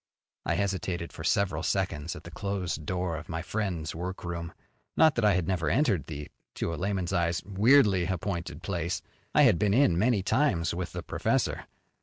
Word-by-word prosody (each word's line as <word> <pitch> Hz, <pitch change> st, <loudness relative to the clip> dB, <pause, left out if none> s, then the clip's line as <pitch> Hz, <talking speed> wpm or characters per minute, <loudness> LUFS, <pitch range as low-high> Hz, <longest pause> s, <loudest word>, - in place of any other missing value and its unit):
I -, -, +2 dB
hesitated 95 Hz, -4 st, -2 dB
for -, -, -8 dB
several 95 Hz, -6 st, +1 dB
seconds 90 Hz, -3 st, -1 dB
at -, -, -10 dB
the 85 Hz, -, -10 dB
closed 85 Hz, -4 st, -3 dB
door 90 Hz, -3 st, -1 dB
of 85 Hz, +5 st, -9 dB
my 80 Hz, -1 st, -3 dB
friend's 90 Hz, -6 st, -2 dB
workroom. 85 Hz, -1 st, -5 dB, 0.5 s
Not 160 Hz, -2 st, +6 dB
that 120 Hz, -, -1 dB
I 105 Hz, -3 st, +5 dB
had 85 Hz, -2 st, 0 dB
never 85 Hz, -5 st, 0 dB
entered 115 Hz, -, +2 dB
the 75 Hz, -2 st, -6 dB, 0.3 s
to 85 Hz, -, -2 dB
a -, -, -2 dB
layman's 95 Hz, 0 st, -2 dB
eyes 85 Hz, -1 st, +1 dB
weirdly 100 Hz, -2 st, +4 dB
appointed 85 Hz, -3 st, -3 dB
place. 85 Hz, -2 st, -2 dB, 0.3 s
I -, -, +7 dB
had -, -, +5 dB
been 105 Hz, -1 st, +2 dB
in 105 Hz, -11 st, +4 dB
many 110 Hz, -3 st, +2 dB
times 105 Hz, -, +1 dB
with 90 Hz, 0 st, -4 dB
the -, -, -5 dB
professor. -, -, -1 dB
90 Hz, 180 wpm, -28 LUFS, 85-100 Hz, 0.5 s, I